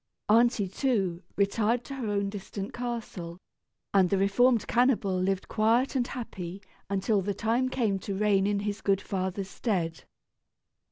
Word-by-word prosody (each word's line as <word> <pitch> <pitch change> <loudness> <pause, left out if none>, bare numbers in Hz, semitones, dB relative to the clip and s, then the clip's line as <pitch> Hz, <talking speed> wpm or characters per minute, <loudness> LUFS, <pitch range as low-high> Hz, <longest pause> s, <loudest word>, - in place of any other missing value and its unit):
Aunty, 230 -2 +4
too, 195 -5 0
retired 215 +4 +1
to 275 - -8
her 260 -4 -4
own 200 -1 0
distant 200 0 -6
castle, 230 -8 -5 0.6
and 190 -3 +5
the 195 - +2
reformed 225 +5 +3
cannibal 240 -6 +2
lived 185 +1 0
quiet 230 +6 +2
and 245 -2 +1
happy 195 -7 -6 0.3
until 200 +1 +1
the 200 +1 -2
time 235 +5 +1
came 220 -7 0
to 195 +1 -4
reign 200 -1 +3
in 205 -1 0
his 205 0 -3
good 195 -1 +2
father's 190 0 -3
stead. 175 -7 -2
205 Hz, 150 wpm, -28 LUFS, 195-235 Hz, 0.6 s, and